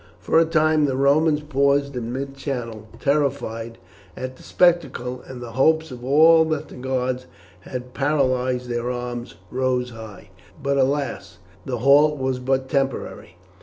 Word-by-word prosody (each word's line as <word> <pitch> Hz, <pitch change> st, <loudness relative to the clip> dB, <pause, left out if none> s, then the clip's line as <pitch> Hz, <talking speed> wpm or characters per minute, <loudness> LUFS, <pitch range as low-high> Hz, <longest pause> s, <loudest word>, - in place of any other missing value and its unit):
For 160 Hz, -, +3 dB
a 165 Hz, -, +4 dB
time 155 Hz, -1 st, +3 dB
the 135 Hz, -2 st, -1 dB
Romans 150 Hz, +3 st, +3 dB
paused 140 Hz, -1 st, +1 dB
in 120 Hz, -1 st, -4 dB
mid 135 Hz, +2 st, -5 dB
channel, 120 Hz, -6 st, -5 dB
terrified 130 Hz, -6 st, -1 dB, 0.4 s
at 130 Hz, 0 st, -5 dB
the -, -, -17 dB
spectacle, 165 Hz, -8 st, +1 dB
and 125 Hz, -2 st, -8 dB
the 120 Hz, -, -8 dB
hopes 160 Hz, +5 st, +2 dB
of 125 Hz, -1 st, -9 dB
all 160 Hz, +5 st, +6 dB
that 155 Hz, -1 st, -3 dB
the -, -, -11 dB
gods 130 Hz, 0 st, -2 dB, 0.3 s
had 125 Hz, +6 st, -7 dB
paralysed 130 Hz, -3 st, 0 dB
their 120 Hz, 0 st, -2 dB
arms 120 Hz, -3 st, -5 dB, 0.2 s
rose 125 Hz, -1 st, 0 dB
high; 110 Hz, -2 st, -11 dB, 0.3 s
but, 140 Hz, 0 st, 0 dB
alas! 130 Hz, -8 st, -1 dB, 0.3 s
the 125 Hz, -, -3 dB
halt 145 Hz, +5 st, +5 dB
was 130 Hz, -1 st, -1 dB
but 130 Hz, +1 st, 0 dB
temporary. 135 Hz, -2 st, -2 dB
130 Hz, 150 wpm, -22 LUFS, 125-145 Hz, 0.4 s, all